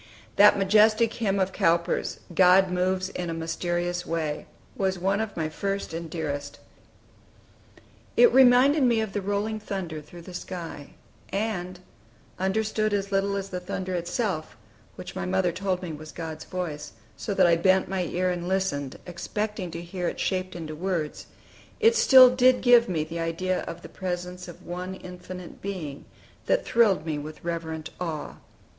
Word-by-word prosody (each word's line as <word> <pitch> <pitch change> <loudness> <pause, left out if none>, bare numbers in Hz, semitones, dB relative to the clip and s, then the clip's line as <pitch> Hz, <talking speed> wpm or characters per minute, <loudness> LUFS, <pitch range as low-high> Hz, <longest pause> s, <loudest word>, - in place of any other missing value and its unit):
That 205 +1 +7
majestic 215 +3 +4
hymn 200 -4 0
of 190 0 +1
Cowper's, 170 -3 +1
"God 185 +1 +5
moves 185 +1 0
in 175 -1 -4
a 165 - -3
mysterious 175 +2 -2
way," 160 -2 -3 0.3
was 190 -1 0
one 195 +3 +1
of 220 -4 -5
my 160 -1 0
first 195 +3 -3
and 165 0 -5
dearest. 145 -3 -4 1.6
It 485 -1 +7
reminded 265 +3 +6
me 240 -3 +4
of 220 -3 -2
the 205 - -1
rolling 205 +2 -1
of - - -11
thunder 180 -7 -4
through 170 +3 -13
the 180 - -10
sky; 170 -5 -7 0.3
and, 185 -3 -3 0.6
understood 215 +2 0
as 200 0 -2
little 200 0 +1
as 195 0 -4
the 180 - -4
thunder 185 +1 -4
itself, 175 -1 -2 0.4
which - - -9
my 90 - -3
mother 180 - +1
told 185 +1 -2
me 170 -3 -4
was 155 0 -9
God's 160 -1 -6
voice, 155 -5 -5 0.2
so 200 - -4
that 190 - +5
I 170 -1 +5
bent 185 +2 +3
my 190 0 -1
ear 180 +2 0
and 175 0 -4
listened, 180 -8 -1
expecting 190 +2 -4
to 170 +1 -6
hear 175 0 -4
it - - -4
shaped 185 -1 -1
into 160 -3 -6
words, 170 -3 -3 0.5
it 455 0 +5
still 255 - +8
did 255 0 +5
give 240 -3 +6
me 155 -3 -1
an 170 - -3
idea 170 +3 -1
of 170 +1 -7
the - - -8
presence 180 0 -5
of 175 - -12
One 180 +2 -5
Infinite 180 -1 -10
Being, 170 -8 -5 0.4
that - - +2
thrilled 205 -8 +3
me 155 -3 -2
with 155 +1 -9
reverent 165 -2 -4
awe. 160 -4 -4
185 Hz, 165 wpm, -26 LUFS, 170-200 Hz, 1.6 s, still